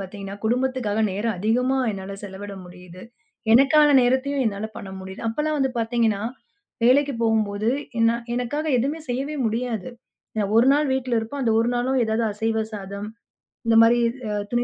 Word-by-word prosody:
பார்த்தீங்கன்னா 195 0 -7
குடும்பத்துக்காக 245 -2 0
நேரம் 205 +2 -2
அதிகமா 245 +6 +1
என்னால 195 -1 -6
செலவிட 200 0 -8
முடியுது. 180 0 -13 0.5
எனக்கான 275 +5 +6
நேரத்தையும் 265 +3 +1
என்னால 205 0 -2
பண்ண 195 - -7
முடியுது. 190 0 -9
அப்பெல்லாம் 300 +6 -1
வந்து 265 -1 +1
பார்த்தீங்கன்னா 225 -3 +1 0.6
வேலைக்குப் 260 +1 +3
போகும்போது 215 -1 +1 0.4
நான் 235 0 -1
எனக்காக 250 +5 -2
எதுவுமே 285 +7 -1
செய்யவே 270 +5 -2
முடியாது. 230 0 -2 0.5
நான் 205 -1 0
ஒரு 235 +2 +6
நாள் 295 +1 +2
வீட்ல 255 -2 0
இருப்போம். 225 +6 -4
அந்த 230 -3 +2
ஒரு 230 +1 +2
நாளும் 255 +2 +1
ஏதாவது 220 +1 0
அசைவ 220 +1 -1
சாதம் 200 0 -6 0.6
இந்த 230 - +4
மாரி 235 +1 +4 0.5
துணி 240 0 +1
230 Hz, 150 wpm, -23 LUFS, 205-255 Hz, 0.6 s, எனக்கான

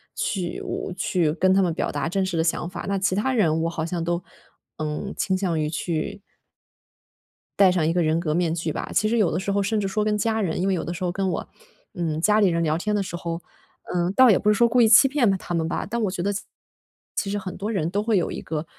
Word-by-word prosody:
去 180 -3 -2
我 - - -4
去 180 -3 +1
跟 185 +2 +3
他 195 - +4
们 180 -3 +1
表 - - -2
达 145 +2 -2
真 190 +2 0
实 185 -2 -3
的 160 - +2
想 170 +1 -1
法， - - -7
那 200 - +1
其 195 0 +1
他 220 +7 0
人 165 -9 +2
我 165 - 0
好 165 -2 -3
像， 170 0 -3
嗯， - - -1
都 170 +1 -1 0.9
倾 190 -1 0
向 185 -4 -1
于 150 -1 0
去 170 +5 -3 1.4
戴 195 -2 +7
上 180 -3 +1
一 160 - +2
个 175 +1 +1
人 160 0 +2
格 155 -3 -1
面 165 -1 +1
具 165 -1 -2
吧， - - -5
其 215 - +2
实 235 - +1
有 210 -6 +3
的 160 - -1
时 190 +2 -2
候 200 0 +1
甚 215 +2 0
至 - - -2
说 210 +2 -1
跟 210 0 +1
家 220 +1 0
人， 175 -3 -1
因 - - 0
为 - - +2
有 180 - -1
的 175 - -3
时 175 - -6
候 180 - 0
跟 195 +1 -1
我， - - -4 0.4
嗯， 160 -3 -2
家 210 +4 +4
里 205 - +5
人 170 -1 +1
聊 155 0 +1
天 210 +4 -1
的 205 - +1
时 175 - -5
候， 170 0 -4 0.5
呃， 175 0 0
倒 255 +5 +6
也 205 - +5
不 210 - +1
是 - - +6
说 235 +3 +4
故 240 +2 +2
意 225 - +6
欺 230 +5 +7
骗 260 -5 +2
了 195 - +2
他 175 - -6
们 165 -1 0
吧， 165 - -2
但 235 +2 -3
我 205 - +1
觉 185 -1 -4
得 200 - +1
其 200 - -2
实 - - -16 0.7
其 200 - 0
实 205 - -1
很 190 -2 -6
多 205 +2 -3
人 185 -8 -1
都 200 +3 -1
会 220 0 +1
有 175 - 0
一 - - -5
个， 155 0 -4
185 Hz, 300 characters per minute, -24 LUFS, 170-205 Hz, 1.4 s, 戴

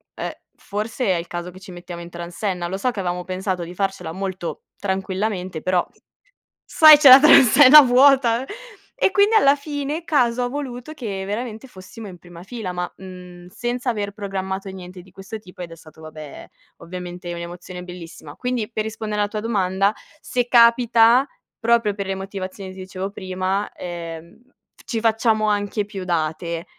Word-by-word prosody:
"Ehm, - - -4 0.2
forse 215 +5 -4
è 185 - +3
il 170 0 -4
caso 175 +1 -6
che 185 - -14
ci 190 -1 -12
mettiamo 175 -1 -9
in 170 - -9
transenna. 175 +1 -4
Lo 190 +2 -4
so 250 +6 0
che 210 - -7
avevamo 180 -1 -3
pensato 185 -1 -3
di 170 +1 -8
farcela 195 -4 -3
molto 190 -1 -5
tranquillamente, 190 -2 -3
però, 185 -1 +1 0.8
sai, 310 -2 +8
c'è 285 -3 +7
la 260 +2 +11
transenna 285 0 +8
vuota". 260 -1 +4 0.5
E 385 - +3
quindi, 410 +2 +3
alla 280 -9 +5
fine, 290 +2 -4
caso 250 -7 +1
ha 245 - 0
voluto 265 0 -6
che 205 -9 -5
veramente 220 +3 -5
fossimo 200 0 -11
in 180 - -10
prima 175 0 -14
fila, 210 -2 -6
ma, 180 -1 -4
mhmm, 180 -1 -12
senza 240 +5 -3
aver 205 -3 -4
programmato 195 -1 -5
niente 185 -1 -10
di 185 +1 -20
questo 195 +4 -8
tipo. 180 -3 -13
Ed 170 -1 -7
è - - -9
stato, 160 -1 -17
vabbè, 155 -2 -10 0.3
ovviamente 180 0 -8
un'emozione 175 +1 -8
bellissima. 170 -4 -11
Quindi, 245 -3 -3
per 215 -1 -2
rispondere 215 -1 -4
alla 205 - 0
tua 215 - -4
domanda: 195 -2 0 0.3
se 245 -1 -2
capita, 235 +1 +5 0.3
proprio 230 -2 +2
per 200 -2 -5
le 195 - -2
motivazioni 190 0 -7
ti 190 - -12
dicevo 190 +1 -6
prima, 190 +1 -3
ehm, 170 +1 -8 0.4
ci 230 -3 -2
facciamo 220 -1 +1
anche 205 0 -1
più 200 -2 -7
date. 170 0 -2
195 Hz, 170 wpm, -21 LUFS, 180-235 Hz, 0.8 s, la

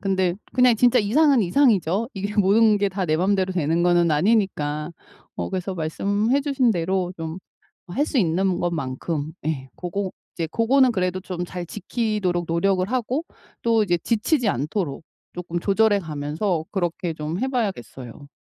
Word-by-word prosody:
근데 190 -3 +1 0.2
그냥 250 -2 +4
진짜 245 +2 +4
이상은 265 +4 +4
이상이죠. 205 - +2
이게 200 +2 -4
모든 210 +1 +4
게 200 0 +1
다 190 0 -3
내 155 -2 +1
맘대로 190 +1 +1
되는 165 -1 +1
거는 175 -1 +3
아니니까. 155 -4 +1 0.4
어 - - -4
그래서 190 0 -3
말씀해 200 - 0
주신 275 -4 +1
대로 180 0 -1
좀 165 +2 -5 0.5
어 175 - -12
할 290 +9 +1
수 280 - -2
있는 185 -1 +1
것만큼, 155 -1 -3
예 135 -4 -2
고거 185 +2 -3 0.2
이제 165 -2 -3
고거는 250 +4 +3
그래도 185 -1 -1
좀 180 -2 -5
잘 180 0 -6
지키도록 200 -3 -2
노력을 185 +2 +1
하고 255 +5 -1 0.4
또 230 -2 +3
이제 175 -4 +1
지치지 230 - 0
않도록 150 - -2 0.3
쪼끔 175 -1 -4
조절해 205 +2 +3
가면서 155 +2 -2
그렇게 175 -3 -2
좀 155 +3 -4
해 265 - 0
봐야겠어요. 145 - -4
185 Hz, 325 characters per minute, -23 LUFS, 170-215 Hz, 0.5 s, 그냥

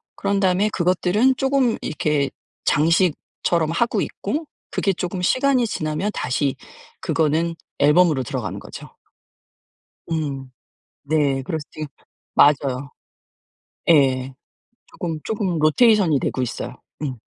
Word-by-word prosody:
그런 200 0 0
다음에 190 +2 +2
그것들은 185 +8 +2
쪼금 265 -3 +2
이렇게 150 -3 0 0.4
장식처럼 165 0 +1
하고 225 +4 +1
있고 295 +11 -3 0.3
그게 195 - +1
쪼금 180 +1 -4
시간이 255 +4 +2
지나면 155 +4 -2
다시 135 +2 -1 0.5
그거는 165 +2 +1 0.2
앨범으로 150 -1 +4
들어가는 - - -4
거죠. - - -11 1.1
음. 140 -5 -3 0.5
네. 140 -2 +1
그래서 160 +2 -3
지금 155 -1 -6 0.5
맞아요. 140 -2 +3 1.0
예. 135 -4 +3 0.6
쪼금, 165 -4 -4
쪼금 200 -6 -1
로테이션이 165 - +4
되고 - - -2
있어요. 120 - -4 0.3
음. 135 -4 -3
165 Hz, 255 characters per minute, -22 LUFS, 145-195 Hz, 1.1 s, 앨범으로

